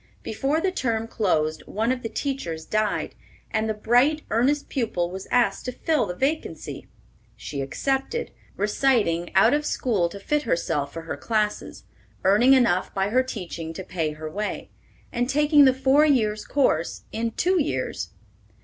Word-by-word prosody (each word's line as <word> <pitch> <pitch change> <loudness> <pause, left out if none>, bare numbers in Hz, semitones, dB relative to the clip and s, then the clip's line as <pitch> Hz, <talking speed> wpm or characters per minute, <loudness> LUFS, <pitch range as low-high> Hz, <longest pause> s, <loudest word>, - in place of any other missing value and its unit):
Before 275 +8 0
the 375 +3 0
term 230 -9 -1
closed 155 -9 0
one 225 +4 0
of 255 -1 -2
the 225 - -4
teachers 175 - -3
died, 215 0 -1 0.4
and 220 0 0
the 215 - -1
bright, 245 +8 +3
earnest 275 +6 +2
pupil 185 -10 -1
was 190 +1 -7
asked 245 -1 +2
to 250 - -2
fill 310 +4 0
the 180 - -4
vacancy. 285 - -3 0.5
She 140 -2 -5
accepted, 270 - -2 0.3
reciting 205 -6 +1
out 190 - +6
of 300 +1 +1
school 210 -12 0
to 200 - -9
fit 295 +9 0
herself 150 - -1
for 165 +1 -7
her 160 -3 -5
classes, 210 +4 -2 0.4
earning 215 +8 +5
enough 235 -9 +3
by 195 +1 +1
her 255 +4 +3
teaching 175 -9 -6
to 190 - -6
pay 165 -4 -2
her 155 +1 -7
way, 205 +7 -4 0.4
and 245 +1 -1
taking 295 +1 +5
the 260 - +7
four 265 +3 +3
years' 220 -8 +2
course 170 - 0
in 230 +1 -1
two 360 +9 +1
years. 130 - -2
225 Hz, 160 wpm, -24 LUFS, 180-270 Hz, 0.5 s, the